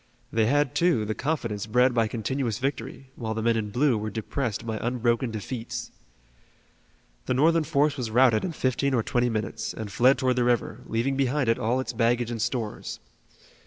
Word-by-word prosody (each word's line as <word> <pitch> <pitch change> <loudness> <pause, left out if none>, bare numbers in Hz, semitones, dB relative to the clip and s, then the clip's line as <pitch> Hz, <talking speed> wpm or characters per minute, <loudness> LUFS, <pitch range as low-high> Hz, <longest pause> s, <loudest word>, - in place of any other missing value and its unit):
They 110 -1 +3
had, 145 0 +2
too, 170 -11 +2
the 110 - -1
confidence 115 -8 -2
bred 125 +3 +3
by 115 -2 +2
continuous 115 0 -2
victory, 135 0 -4
while 110 -2 -4
the 110 - -2
men 115 0 +3
in 110 -2 -2
blue 125 +1 +2
were 110 +1 -3
depressed 115 +1 -3
by 110 -1 -3
unbroken 120 0 0
defeats. 115 +2 -5 1.4
The 130 - +1
Northern 165 +4 +4
force 150 -1 +1
was 125 -4 -3
routed 115 -1 +4
in 180 - -2
fifteen 135 0 0
or 115 - +1
twenty 120 +2 +1
minutes 110 -2 -3
and 110 -2 -6
fled 125 +6 +4
toward 130 -1 +1
the 125 - +3
river, 120 -1 0
leaving 130 +4 0
behind 135 -1 +1
it 115 - +2
all 120 +4 +1
its 125 -2 -3
baggage 120 +1 +1
and 115 -2 -3
stores. 115 -2 -3
120 Hz, 185 wpm, -26 LUFS, 110-130 Hz, 1.4 s, Northern